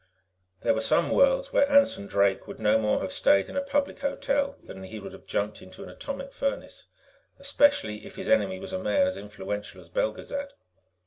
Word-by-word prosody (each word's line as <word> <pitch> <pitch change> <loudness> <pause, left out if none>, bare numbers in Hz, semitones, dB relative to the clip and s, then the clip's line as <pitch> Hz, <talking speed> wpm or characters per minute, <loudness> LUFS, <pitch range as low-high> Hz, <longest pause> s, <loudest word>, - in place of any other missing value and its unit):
There 285 - +3
were - - -1
some - - +2
worlds - - +3
where 280 - +4
Anson 280 - +4
Drake 100 -1 +1
would - - -9
no 105 +1 +3
more 105 -1 +1
have 95 - -4
stayed 100 -1 +3
in - - -8
a 280 - +1
public 280 0 -1
hotel 280 0 -1
than 95 - -10
he 105 +3 -8
would 100 - -9
have - - -14
jumped 105 +1 -2
into 95 0 -11
an - - -9
atomic 275 -1 -6
furnace, 275 0 -4 0.5
especially 280 - +2
if 195 - -11
his 190 0 -6
enemy 190 -9 +2
was 190 0 -8
a 185 - -1
man 280 +9 +2
as 280 - -1
influential 105 0 -6
as - - -15
Belgezad. 285 - -3
275 Hz, 195 wpm, -27 LUFS, -, 0.5 s, where